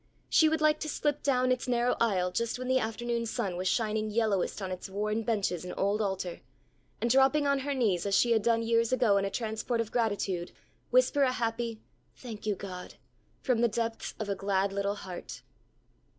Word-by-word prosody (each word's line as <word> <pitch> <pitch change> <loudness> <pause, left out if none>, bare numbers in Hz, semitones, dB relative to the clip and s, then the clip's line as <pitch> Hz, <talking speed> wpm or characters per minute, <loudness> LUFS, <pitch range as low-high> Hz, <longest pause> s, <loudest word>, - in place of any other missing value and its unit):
She 315 - +5
would 320 0 0
like 305 0 +4
to 310 - -4
slip 295 0 -1
down 255 -2 +2
its 255 0 0
narrow 245 0 +2
aisle 185 -6 +2
just 235 +4 -1
when 255 0 -5
the 260 0 +3
afternoon 235 +1 -2
sun 195 -4 -2
was 185 +1 -2
shining 215 0 0
yellowest 215 -4 0
on 190 -2 -4
its 185 +1 -6
worn 210 +3 -1
benches 205 -7 -1
and 180 - -6
old 200 +2 +1
altar, 190 -3 -3 0.6
and - - 0
dropping 270 +4 +4
on 280 -1 +2
her 280 +1 -2
knees 205 -8 +1
as 200 - +2
she 235 +4 +4
had 225 -2 +4
done 230 +1 +2
years 230 0 +2
ago 240 -6 +3
in 195 - +1
a - - -1
transport 225 +2 -2
of 230 -1 -2
gratitude, 200 -6 -1 0.4
whisper - - +3
a 265 -2 +4
happy 230 -2 -2 0.3
"Thank 220 -4 -8
you, 210 - +1
God" 185 -2 -8 0.5
from 250 -4 +2
the 240 - +5
depths 230 0 -3
of 215 - -4
a 200 - 0
glad 195 0 0
little 200 0 -1
heart. 185 -3 -8
225 Hz, 200 wpm, -30 LUFS, 200-245 Hz, 0.6 s, She